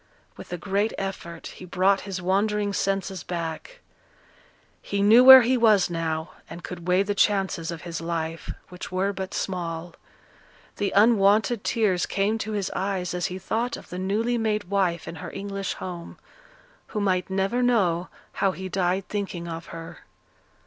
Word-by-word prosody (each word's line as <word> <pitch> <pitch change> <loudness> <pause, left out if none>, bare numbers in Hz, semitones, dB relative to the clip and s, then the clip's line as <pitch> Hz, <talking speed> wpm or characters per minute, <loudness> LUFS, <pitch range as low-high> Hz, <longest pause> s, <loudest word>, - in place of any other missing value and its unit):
With - - -11
a 175 - -2
great 200 +4 0
effort 170 -4 -5
he - - -9
brought 185 +2 +2
his 190 -1 -3
wandering 205 +2 +1
senses 195 -2 -1
back; 170 - -5 1.0
he 200 0 -1
knew 225 +5 +7
where 265 -1 +11
he 255 +2 +2
was 215 -6 +4
now, 160 -1 -2 0.2
and 170 +2 -9
could 175 -1 -8
weigh 180 +2 +4
the 205 +1 -1
chances 195 -5 +1
of 170 -1 -6
his 170 -2 -5
life, 165 -1 -3 0.2
which 180 0 -8
were 190 +2 0
but 190 -1 -5
small; 170 -2 -3 0.8
the 205 -1 0
unwonted 210 +1 +4
tears 200 -6 +1
came 205 +3 0
to 215 0 -4
his 200 -2 -2
eyes 190 -2 -2
as 180 -1 -1
he 185 -1 -5
thought 225 +6 -2
of - - -13
the 180 - -5
newly 220 +6 0
made 215 -2 0
wife 180 -4 0
in 170 - -6
her 180 - -7
English 195 -1 -4
home, 175 -2 -7 0.7
who 215 - -4
might 185 -3 0
never 195 +6 0
know 185 -8 +2 0.3
how 195 -1 +3
he 190 0 -6
died 185 +1 0
thinking 190 -4 -4
of 165 0 -6
her. 165 0 -9
190 Hz, 165 wpm, -25 LUFS, 175-205 Hz, 1.0 s, where